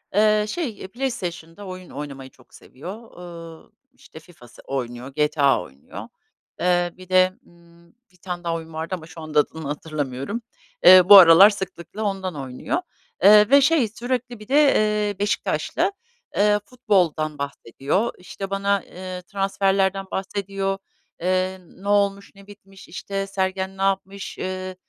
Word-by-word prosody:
Iıı, 215 0 +3
şey 235 - -4
PlayStation'da 195 -7 -5
oyun 185 -1 -9
oynamayı 135 -2 -8
çok 125 - -25
seviyor. 195 - -11
Iıı, 170 -1 -11 0.2
işte 160 -10 -15
FIFA 155 -7 -18
s 120 - -17
oynuyor, 125 -1 -5
GTA 150 - +2
oynuyor. 70 -3 -11 0.5
Eee, 175 -1 +1
bir 185 0 -14
de, 185 0 +4
ımm, 170 0 -22 0.2
1 180 - -25
tane 175 -1 -6
daha 170 -1 -1
oyun 165 -1 -8
vardı 160 +4 -3
ama 160 -3 -11
şu 160 0 -11
anda 155 -1 0
adını 155 0 -2
hatırlamıyorum. 145 - -4 0.4
Eee, 185 0 +10
bu 200 - +12
aralar 180 +3 +9
sıklıkla 190 0 -6
ondan 190 -4 -3
oynuyor. 130 -3 -4 0.5
Iıı, 210 +2 +7
ve 280 0 +7
şey 285 -5 +3
sürekli 245 +1 -4
bir 215 - -12
de, 275 - 0 0.2
eee, 210 -2 0
Beşiktaşlı, 205 - -1 0.4
eee, 210 0 +3
futboldan 175 - 0
bahsediyor. 140 - -2
İşte 195 +2 -8
bana, 200 0 0
ııı, 185 0 -6
transferlerden 195 0 0
bahsediyor. 195 0 -3 0.4
Eee, 185 +1 0
ne 190 +3 -14
olmuş? 200 -1 +1
Ne 195 0 -16
bitmiş? 195 -2 -15
İşte 195 +2 -5
Sergen 190 0 -2
ne - - -7
yapmış? 195 0 -2
Iıı, 185 0 -5
185 Hz, 145 wpm, -23 LUFS, 165-200 Hz, 0.5 s, bu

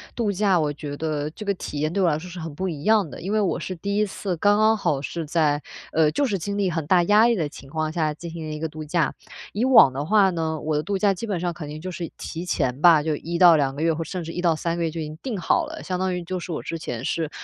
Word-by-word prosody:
度 220 -4 0
假， 195 -2 +2
我 150 -2 0
觉 145 -1 -6
得 150 -1 -2
这 210 - -9
个 200 - +1
体 145 -4 -6
验 155 +1 0
对 195 - 0
我 175 - +4
来 150 - +1
说 180 +3 -8
是 175 0 -8
很 160 -2 -6
不 185 +2 -2
一 150 -3 -6
样 215 -5 +4
的。 - - -9
因 190 +4 -4
为 215 - +3
我 195 - 0
是 185 - -5
第 200 +4 -3
1 210 - +3
次， 190 -3 -4
刚 205 +4 +4
刚 220 +1 +4
好 150 -8 0
是 165 +2 -4
在 150 -2 +1 0.3
呃， 155 -1 +3
就 285 - +1
是， 200 -7 -1
经 200 +4 -3
历 190 -3 +1
很 160 -3 -3
大 180 -1 +4
压 210 +5 +5
力 235 - +3
的 155 -6 -1
情 135 -2 -12
况 155 0 -2
下， 155 -3 0
进 170 +2 -8
行 165 -2 -6
的 155 - -4
一 - - -6
个 160 0 -3
度 155 0 -8
假。 165 +1 0 0.4
以 225 +5 0
往 245 - +7
的 140 +3 -4
话 200 0 +4
呢， 160 -3 -2
我 155 -1 -1
的 - - +1
度 200 -1 -1
假 200 0 +3
基 225 +5 -6
本 195 -4 -1
上 175 -1 -1
肯 150 -3 -7
定 155 +1 -7
就 185 +1 -5
是 170 -2 -5
提 170 +2 -6
前 130 -4 -1
吧， 165 -4 +7
就 155 -1 0
1 170 +1 -4
到 170 -3 +7
2 135 -1 0
个 150 - -5
月， 165 -1 +3
或 160 - -6
者 - - -11
甚 180 -3 -4
至 165 - -6
1 175 - -4
到 170 -3 +3
3 170 +2 -2
个 170 - -1
月 165 - 0
就 165 0 -5
已 - - -2
经 155 +1 -7
定 240 -7 -3
好 175 - +1
了。 - - -8
相 185 -1 -3
当 185 -1 0
于， 175 - -4
就 185 +1 -4
是， 175 - -7
我 - - -4
之 165 - -4
前 125 -6 -5
是 160 0 -1
170 Hz, 325 characters per minute, -24 LUFS, 155-190 Hz, 0.4 s, 往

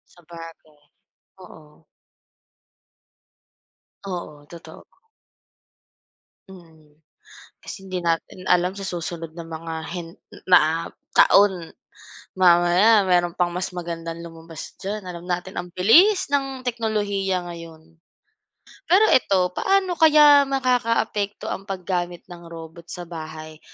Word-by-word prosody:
Sabagay, 165 -3 -14 0.6
oo. 155 -3 -16 2.2
Oo, 150 -5 -7
totoo. 170 -1 -12 1.7
Mm, 160 -5 -17 0.6
kasi 195 - -10
hindi 185 -1 -4
natin 170 +2 -2
alam 180 +1 +2
sa 200 - -9
susunod 165 -2 -6
na 165 - -7
mga 165 0 -7
hen 170 -1 -6 0.4
na 165 -2 +4 0.2
taon, 190 -5 +4 0.7
mamaya 180 +4 +5
meron 175 -1 +2
pang 175 0 0
mas 180 +1 -4
magandang 170 -1 -6
lumabas 165 -1 -10
diyan. 210 +1 -4
Alam 175 -1 -8
natin 180 +1 -4
ang 175 0 -6
bilis 325 - +4
ng 270 -2 -1
teknolohiya 205 -6 -2
ngayon. 165 -1 -12 0.9
Pero 375 +5 +5
eto, 185 -7 +2
paano 385 - +1
kaya 295 -3 +6
makakaapekto 230 -6 -1
ang 195 +2 -6
paggamit 180 -2 -4
ng 170 -1 -11
robot 165 0 -11
sa 175 - -7
bahay 155 -2 -9
175 Hz, 105 wpm, -22 LUFS, 165-200 Hz, 2.2 s, kaya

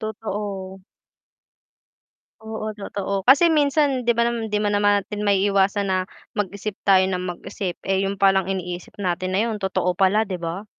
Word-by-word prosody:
Totoo. 200 -3 -5 1.6
Oo, 220 0 -5
totoo. 200 -1 -3
Kasi 320 +5 +7
minsan 285 -2 +2
'di 235 - +4
ba 235 - +3
nam 235 -2 -1
'di 210 - -1
ma 205 - +1
naman 205 -1 +3
natin 210 -1 -6
maiiwasan 200 +1 +2
na - - +2 0.4
mag-isip 205 0 -3 0.2
tayo 190 -1 +6
ng 185 -1 -1 0.2
mag-isip, 180 -2 -5
eh, 190 0 +1
yun 195 +1 -1
palang 195 -1 +3
iniisip 180 -2 -5
natin 185 -1 -2
na 210 - +2
yun 220 -3 -3
totoo 185 -2 0
pala, 195 +4 +3
'di 185 -4 -5
ba? 170 +4 -4
200 Hz, 160 wpm, -22 LUFS, 190-215 Hz, 1.6 s, Kasi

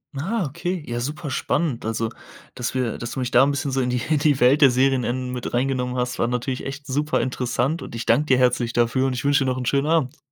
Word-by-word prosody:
Ah, 190 +8 -1
okay, 175 +5 -3
ja 120 0 -3
super 150 +4 -4
spannend. 135 -1 -1
Also, 115 0 -1 0.5
dass 125 -1 -3
wir 125 -3 -1
dass 120 - -6
du - - -4
mich 125 -1 -1
da 125 - +6
'n 140 - +2
bisschen 140 0 -2
so 135 0 0
in 125 - 0
die 125 -1 -1
in 155 -2 +3
die 145 -2 +2
Welt 130 +5 +4
der 140 -3 +7
Serienenden 130 -1 +1
mit 125 -1 -5
reingenommen 125 0 0
hast, 125 0 -2
war - - +1
natürlich 125 +1 -3
echt 140 +1 -7
super 150 +3 0
interessant 130 +4 -1
und - - -8
ich 115 0 -5
danke 150 - +3
dir 130 - +4
herzlich 125 -2 +2
dafür 120 +3 +2
und 130 - -1
ich 125 - -4
wünsche 145 -1 +3
dir 130 - 0
noch 125 - -3
'n 125 - -4
schönen 140 +3 +1
Abend. 155 -4 +1
130 Hz, 255 wpm, -23 LUFS, 125-145 Hz, 0.5 s, der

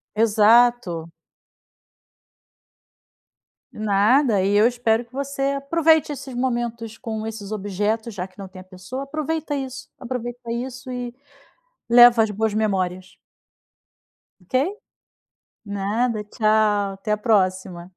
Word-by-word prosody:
Exato. 220 -5 +3 2.6
Nada 215 +2 +2
e 200 +1 +1
eu 210 +3 +5
espero 240 -1 +1
que 235 - -32
você 280 0 -4 0.2
aproveite 315 +1 +2
esses 270 -2 -7
momentos 235 -3 -3
com 220 -3 -5
esses 215 -2 -7
objetos, 210 +2 -2
já 180 -1 -5
que 185 - -29
não 195 -1 -8
tem 185 0 -12
a - - -13
pessoa, 185 +9 -7
aproveita 310 +1 -3
isso, 270 -1 -6
aproveita 240 -1 -5
isso 255 +2 -5
e 245 -1 -5 0.8
leva 240 -1 +8
as 220 - 0
boas 215 +1 -1
memórias. 185 -3 -2 1.2
Ok? 180 - -26 1.1
Nada, 210 +3 -1
tchau, 210 -2 +1
até 195 +2 -7
a - - +2
próxima. 185 -5 0
225 Hz, 115 wpm, -22 LUFS, 205-245 Hz, 2.6 s, leva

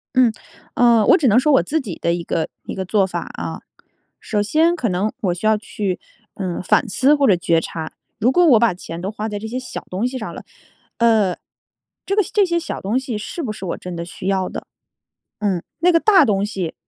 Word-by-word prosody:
嗯， 255 -3 +5 0.4
呃， 235 -3 +5
我 - - +7
只 295 - +2
能 225 +1 +5
说 300 +4 +2
我 270 - +6
自 315 +2 0
己 195 -10 -6
的 170 - +1
一 175 0 -3
个 165 - -1 0.2
一 - - -6
个 190 - -4
做 195 +1 +2
法 190 - -5
啊， - - -5 0.6
首 210 - -1
先 320 +10 +2
可 255 -8 -1
能 195 +3 -1
我 180 -4 +1
需 175 - -10
要 220 0 +4
去， 205 -3 -3 0.4
嗯， 185 -3 -4
反 225 - +2
思 265 +9 +3
或 285 -1 +3
者 195 - +5
觉 170 -1 +2
察， 160 -1 -6 0.3
如 230 +3 +3
果 350 +6 +4
我 255 -8 +7
把 235 -2 +3
钱 170 -1 -8
都 190 +3 -3
花 215 0 -4
在 210 -1 -4
这 220 - -6
些 245 +3 -3
小 255 - -7
东 190 +6 -1
西 255 +1 -4
上 220 - -6
了， - - -9 0.5
呃， 220 -5 +3 0.7
这 395 - 0
个 420 - +4
这 410 -2 +4
些 340 -1 0
小 330 - -5
东 205 +5 -1
西 255 -5 -4
是 275 +10 -5
不 250 - -3
是 215 - -9
我 170 - -3
真 180 -1 -7
的 170 - -4
需 180 +2 -6
要 190 -1 +1
的？ - - -7 0.7
嗯， 195 -5 0 0.2
那 355 +2 +4
个 335 - +4
大 380 -4 +5
东 200 -4 +1
西 190 -5 -3
215 Hz, 250 characters per minute, -20 LUFS, 185-260 Hz, 0.7 s, 我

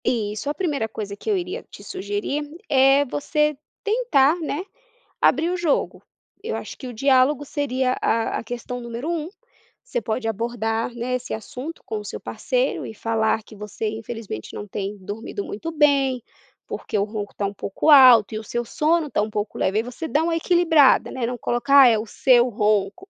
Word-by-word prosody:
Isso, 215 +2 -1
a - - 0
primeira 295 - -2
coisa 205 -2 -6
que 320 - -6
eu 410 - +2
iria 370 +6 -4
te - - -12
sugerir 380 -6 -3 0.3
é 270 0 +5
você 300 +2 0 0.3
tentar, 420 - +3
né, 310 +2 -3 0.6
abrir 320 +6 +3
o 365 - -1
jogo. 340 -5 0 0.4
Eu 460 +2 -3
acho - - -8
que 260 - -8
o 250 - -6
diálogo 270 +3 +3
seria 260 -3 -1
a 225 0 0
a - - -6
questão 245 +1 -5
número 235 +4 -5
um, 325 -2 -2 0.6
você - - -3
pode 225 +1 -2
abordar, 225 +1 -2
né, 240 +2 -3
esse 250 0 -3
assunto 255 +8 -6
com 220 -1 -3
o - - -8
seu - - -6
parceiro - - -2
e - - -8
falar 220 0 0
que 215 - -14
você 210 +1 -5
infelizmente 220 - -6
não 205 - -6
tem 200 +1 -4
dormido 205 +1 -6
muito 325 +11 -5
bem, 280 -5 +2 0.4
porque - - -4
o 200 - +2
ronco 205 -1 -5
tá 200 - -2
um 200 - -3
pouco 200 +10 0
alto 250 -7 +8
e 215 - -2
o - - -9
seu 240 +2 -3
sono 315 +6 +1
está 265 - 0
um 210 - -2
pouco 210 0 -4
leve, 195 - +1
aí 220 - +2
você 250 +7 -6
dá 310 +1 +1
uma 335 0 0
equilibrada, 325 -4 +4
né, 245 -3 -2
não 245 +1 -3
colocar 265 +4 +5
é 225 -3 +4
o 215 - -4
seu 245 +2 +4
ronco. 210 - 0
250 Hz, 190 wpm, -23 LUFS, 220-300 Hz, 0.6 s, alto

